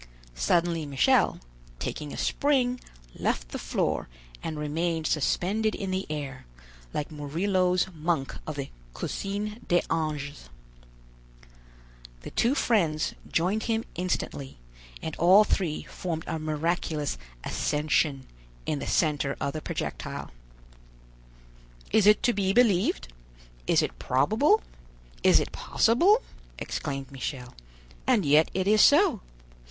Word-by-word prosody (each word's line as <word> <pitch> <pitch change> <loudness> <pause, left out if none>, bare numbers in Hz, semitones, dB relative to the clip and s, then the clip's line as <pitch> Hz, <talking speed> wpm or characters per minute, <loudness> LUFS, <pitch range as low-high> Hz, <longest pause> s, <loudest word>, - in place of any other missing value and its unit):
Suddenly 165 - +1
Michel, 135 -2 +3 0.4
taking 150 - -4
a - - -7
spring, 255 -4 +1 0.3
left - - -2
the - - -5
floor - - -1 0.3
and 160 -1 -4
remained 160 +2 -1
suspended 200 +9 +1
in 195 -2 -4
the 190 +1 -2
air, 140 - -5 0.4
like 150 - -3
Murillo's 180 +5 +1
monk 160 -4 -1
of 155 - -4
the 140 -1 -5 0.2
Cusine 210 +2 -3
des 175 0 +3
Anges. 145 - -3 1.7
The - - -8
two 245 +4 +2
friends 165 - +1 0.2
joined 190 +6 +1
him 225 -1 0
instantly, 170 -6 -3 0.5
and 160 - -4
all 185 +5 +7
three 175 -7 -1
formed 165 -3 -4
a 160 - -3
miraculous 155 - -1 0.2
"Ascension" 150 -2 0 0.4
in 150 - -1
the - - -5
center 145 -3 +1
of 140 - -2
the 155 - -4
projectile. - - -5 1.6
"Is 210 -2 +4
it 210 - +6
to 240 - +3
be 195 -1 +1
believed? 200 - +2 0.5
is - - +4
it - - -4
probable? 220 - +3 0.6
is - - +6
it - - -3
possible?" 360 - +3 0.3
exclaimed 135 -3 -4
Michel; 130 -2 -5 0.5
"and 235 -9 +3
yet 150 +3 +5
it 190 0 0
is 215 +1 +5
so. 300 - +5
165 Hz, 120 wpm, -27 LUFS, 145-205 Hz, 1.7 s, all